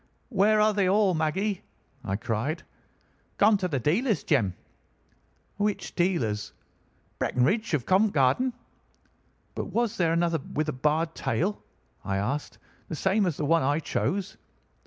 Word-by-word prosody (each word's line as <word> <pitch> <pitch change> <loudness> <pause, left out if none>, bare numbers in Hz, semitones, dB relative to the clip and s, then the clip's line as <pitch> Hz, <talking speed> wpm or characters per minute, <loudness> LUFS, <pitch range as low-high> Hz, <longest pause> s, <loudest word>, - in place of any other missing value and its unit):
"'Where 215 0 +3
are 215 0 +4
they 200 -3 +2
all, 200 -1 +3
Maggie?' 180 +5 -1 0.4
I 95 -3 -2
cried. 115 - -2 0.7
"'Gone 210 +1 +5
to 185 - 0
the 145 -6 -1
dealer's, 190 - +1
Jem.' 105 - +1 1.0
"'Which 205 0 -1
dealer's?' 115 - 0 0.7
"'Breckinridge, 175 - +1
of 130 - -3
Covent 195 +3 +3
Garden.' 160 - +2 1.0
"'But - - -3
was 235 -2 -1
there 170 -3 +2
another 170 -1 +1
with 150 +2 -3
a - - -2
barred 155 +5 0
tail?' 200 +5 -1 0.4
I 95 0 -1
asked, 130 +9 -3 0.3
'the 160 - -3
same 195 +4 +2
as 165 - -2
the 150 - -1
one 165 +2 +3
I 145 +3 +1
chose? 195 +4 -2
170 Hz, 140 wpm, -27 LUFS, 145-205 Hz, 1.0 s, Gone